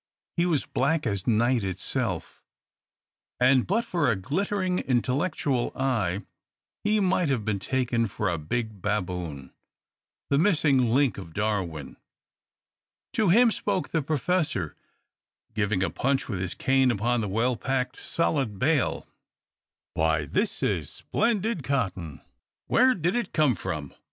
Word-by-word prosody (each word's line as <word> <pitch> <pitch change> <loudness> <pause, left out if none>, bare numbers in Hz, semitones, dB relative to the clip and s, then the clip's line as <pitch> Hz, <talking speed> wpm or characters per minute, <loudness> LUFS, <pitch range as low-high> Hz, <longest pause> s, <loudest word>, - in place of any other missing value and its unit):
He 170 0 +2
was 160 -5 +1
black 150 +3 0
as 100 -5 -2
night 120 +1 +3
itself; 95 +1 -3 1.0
and 125 0 +4
but 225 +5 +1
for 170 - +1
a 115 - +2
glittering, 180 - -1
intellectual 130 +1 0
eye, 110 -8 0 0.6
he 210 +1 +2
might 185 -4 +2
have 120 -6 0
been 105 -2 0
taken 120 +1 0
for 105 +1 -3
a 85 -3 0
big 110 +5 -3
baboon, 90 -9 -3 0.8
the 140 - +4
missing 150 - +3
link 125 -3 +2
of 85 -4 -10
Darwin. 95 -9 -2 1.2
To 215 -4 +2
him 230 +6 +6
spoke 200 -3 -2
the 160 - 0
Professor, 150 - -1 0.8
giving 105 -3 0
a 90 - -1
punch 135 - 0
with 100 -6 -3
his 90 0 -3
cane 135 -1 +3
upon 120 +1 +1
the 105 - -2
well 115 +5 +1
packed, 130 +2 -2
solid 135 -10 -1
bale: 140 +5 +1 0.9
"Why, 80 -1 +1
this - - -1
is - - 0
splendid 220 -4 -1
cotton! 95 - -2 0.4
Where 255 +1 +4
did 175 +3 0
it 235 -5 -2
come 150 -5 +3
from? 75 -7 -5
125 Hz, 135 wpm, -26 LUFS, 100-160 Hz, 1.2 s, him